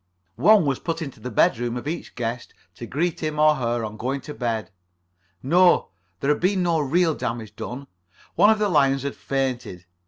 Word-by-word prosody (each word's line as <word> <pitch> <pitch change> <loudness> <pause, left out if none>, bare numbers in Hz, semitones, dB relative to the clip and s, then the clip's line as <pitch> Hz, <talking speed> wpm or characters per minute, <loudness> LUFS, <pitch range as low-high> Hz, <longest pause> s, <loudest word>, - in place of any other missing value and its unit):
One 210 -5 +5
was 135 -2 0
put 165 0 -3
into 135 -4 -9
the 125 - -6
bedroom 120 +1 +1
of 125 - -6
each 165 +3 -5
guest 120 0 -4 0.2
to 120 +5 -9
greet 165 +7 -1
him 155 -1 -3
or 150 0 +4
her 120 -2 -1
on 110 0 -7
going 135 +4 -3
to 150 - -8
bed. 115 -4 -3 0.7
No, 175 +6 +4 0.3
there 140 - +2
had 150 - 0
been 185 +1 +2
no 170 -2 +1
real 160 +4 +2
damage 115 -6 -5
done. 130 +3 -6 0.5
One 205 - +5
of 220 - +4
the 210 -1 +1
lions 135 -6 +2
had 140 - -3
fainted. 125 -10 -3
140 Hz, 190 wpm, -23 LUFS, 120-165 Hz, 0.7 s, One